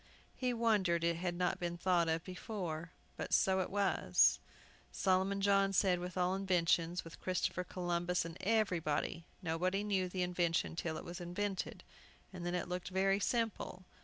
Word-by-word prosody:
He 255 -1 0
wondered 210 -8 +2
it 170 0 +2
had 175 0 -2
not 180 0 0
been 175 -1 -3
thought 175 -2 +2
of 160 0 0
before; 180 -4 -5 0.3
but - - -4
so 190 0 +3
it 185 - -1
was, 200 -1 +3 0.5
Solomon 190 +1 +1
John 195 0 +3
said, 185 -2 +3
with 180 +1 -6
all 180 0 +2
inventions, 175 -2 +1
with 165 - -11
Christopher 185 0 -1
Columbus, 175 -1 -1
and 165 -1 -6
everybody. 175 -6 0 0.2
Nobody 180 +4 0
knew 190 -3 0
the 180 0 -1
invention 175 -2 0
till 160 -2 -2
it - - -8
was 175 +1 -7
invented, 190 +2 -3 0.5
and 180 -2 -7
then 175 - -1
it 180 - -2
looked 180 0 -4
very 195 +1 +2
simple. 220 -4 -1
180 Hz, 160 wpm, -35 LUFS, 170-195 Hz, 0.5 s, so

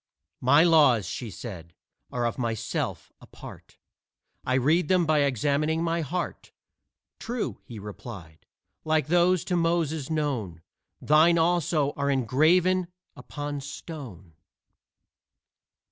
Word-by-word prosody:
"My 140 +5 +5
laws," 145 - +5
she 120 +4 -5
said, 85 -4 -9 0.4
"are 120 -1 -1
of 120 - -2
myself 115 -2 -3
a - - -15
part: - - -13 0.7
I 130 - 0
read 150 +6 +2
them 180 -2 +3
by 155 -1 +2
examining 145 +4 +1
my 170 0 0
heart." 170 +4 -4 0.7
"True," 240 0 -4
he 115 - -10
replied; 100 -5 -10 0.4
"like 155 -1 0
those 175 0 +3
to 180 - -1
Moses 165 -4 0
known, 125 - -2 0.4
Thine 160 +3 +4
also 165 -3 +1
are 140 0 0
engraven 165 +8 +2 0.3
upon 145 -1 -6
stone." 130 - -9
145 Hz, 115 wpm, -26 LUFS, 120-165 Hz, 0.7 s, My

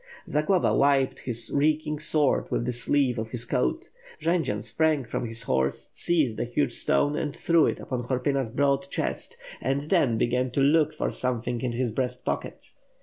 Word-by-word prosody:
Zagloba 160 +5 +2
wiped 135 -1 +2
his 115 -2 -3
reeking 150 +1 +1
sword 150 -2 +1
with - - -1
the 125 - -1
sleeve 125 +1 +1
of 110 0 -4
his 120 0 -1
coat. 65 - -1 0.3
Jendzian 160 -10 0
sprang 145 +4 +1
from 120 - -3
his 115 +1 -3
horse, 65 -9 -1
seized 150 -10 0
a - - +1
huge 120 +1 -1
stone 145 +4 +1
and 150 -2 -2
threw 165 -2 +3
it - - -2
upon 125 -2 -4
Horpyna's 130 0 0
broad 140 +2 +1
chest 470 - -2 0.2
and 135 +1 0
then 135 -11 +3
began 125 +2 +1
to - - 0
look 150 +2 +4
for 155 - -2
something 120 -1 -2
in 125 -2 -2
his 120 -1 -1
breast 125 +1 -3
pocket. - - -4
130 Hz, 175 wpm, -26 LUFS, 120-150 Hz, 0.3 s, look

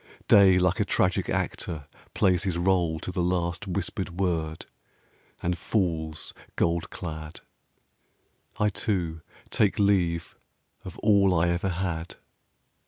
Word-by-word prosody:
Day 95 -2 +7
like 90 0 +2
a - - +4
tragic 90 -2 +1
actor 75 -4 -2 0.3
plays 90 -2 +3
his 95 -3 -1
rôle 85 -3 +1
To - - -4
the 90 - -1
last 90 +3 -1
whispered 95 -1 -3
word, 80 -4 -1 0.8
and 90 +1 +1
falls 80 -4 -2 0.2
gold 85 0 0
clad. 80 -2 -7 1.2
I, 105 - +3
too, 85 -6 -2 0.3
take 105 -3 +2
leave 90 -5 +1 0.5
of 95 - -9
all 100 -5 +4
I 85 +1 +2
ever 85 +3 0
had. 85 -2 -3
90 Hz, 120 wpm, -27 LUFS, 85-95 Hz, 1.2 s, Day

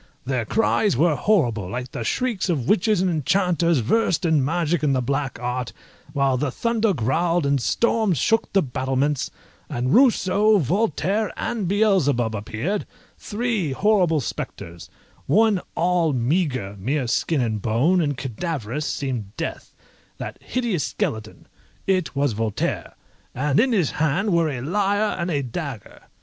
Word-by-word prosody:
Their 130 -3 -1
cries 210 - +1
were 165 +3 +4
horrible, 120 - +1
like 125 +4 -5
the 115 - -4
shrieks 220 - -1
of 140 -9 -1
witches 210 -1 +3
and 185 -1 +1
enchanters 170 -1 +1
versed 180 - +1
in 155 -4 +3
magic 165 +2 0
and 145 -3 +2
the - - +2
black 135 +1 -2
art, 125 0 -3 0.4
while 140 -3 +1
the 140 +2 -1
thunder 230 - 0
growled, 165 - +1
and 140 -2 +1
storms 220 - +1
shook 225 - +1
the 195 - +3
battlements, 135 +1 -1 0.4
and 125 +2 -1
Rousseau, 215 -4 +4
Voltaire, 195 - 0
and 215 -6 -2
Beelzebub 175 - +2
appeared, 110 - -3 0.3
three 210 - -2
horrible 180 -4 +2
spectres; 85 -7 -6 0.4
one 210 +4 +3
all 170 -2 +2
meagre, 130 - -1
mere 130 +7 -1
skin 145 +6 0
and 110 -4 -1
bone, 135 - +2
and 145 -4 -1
cadaverous, 140 0 -3
seemed 120 -7 -4
death, - - -5 0.5
that - - -7
hideous 235 - -1
skeleton; 110 -1 -4 0.4
it 185 -6 0
was 140 -3 +1
Voltaire, 110 -1 -2 0.4
and 145 +2 +1
in 255 +3 +3
his 185 - +2
hand 175 +7 0
were 165 -2 +3
a 130 -4 -4
lyre 205 - 0
and 170 +1 -1
a 145 -4 0
dagger. 130 - -6
155 Hz, 145 wpm, -23 LUFS, 130-195 Hz, 0.5 s, were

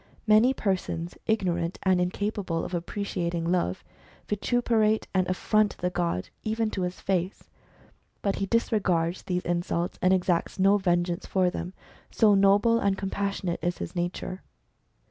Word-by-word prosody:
Many 215 +3 +5
persons, 185 -7 -2
ignorant 175 -5 0
and 185 -2 +3
incapable 185 -2 -2
of - - -7
appreciating 175 -2 -2
Love, 175 - 0 0.4
vituperate 220 0 +1
and 185 -1 +2
affront 210 +3 +1
the 180 0 -1
god, 170 - -2
even 220 0 -1
to 190 - -3
his 180 0 -3
face. 185 0 -2 0.7
But 200 -1 0
he 195 - -2
disregards 190 -7 +1
these 180 -1 -3
insults, 175 0 -1
and 185 - +4
exacts 180 -2 +1
no 195 +2 +5
vengeance 175 -1 0
for 185 -2 +2
them, 180 0 -5 0.4
so 215 -3 +4
noble 200 +4 +4
and 200 -3 +1
com 195 0 -4
passionate 195 -3 -2
is 175 0 -1
his - - -6
nature. 180 +1 -3
185 Hz, 145 wpm, -27 LUFS, 175-205 Hz, 0.7 s, Many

